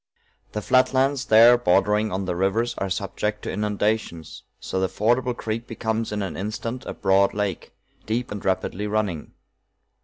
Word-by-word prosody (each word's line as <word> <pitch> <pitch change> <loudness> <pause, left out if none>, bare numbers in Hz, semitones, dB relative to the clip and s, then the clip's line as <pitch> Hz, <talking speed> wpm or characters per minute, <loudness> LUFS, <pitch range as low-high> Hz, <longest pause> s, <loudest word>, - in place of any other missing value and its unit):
"The 105 - -3
flat 130 +1 +3
lands 135 0 +2
there 120 +2 +7
bordering 105 +1 +2
on 95 +1 -2
the 90 -1 -2
rivers 100 +6 0
are 95 - -2
subject 100 +3 -3
to - - -3
inundations, 105 -5 -2 0.2
so 95 - -3
the 95 0 0
fordable 120 +3 +1
creek 115 +1 -4
becomes 110 -1 -2
in 105 -1 -2
an 95 - -5
instant 115 +5 -5
a - - -5
broad 95 +1 +2
lake, 105 -4 -3 0.4
deep 120 +3 -2
and 105 -1 -5
rapidly 95 +2 -1
running. 105 -7 -2
105 Hz, 160 wpm, -24 LUFS, 95-115 Hz, 0.4 s, there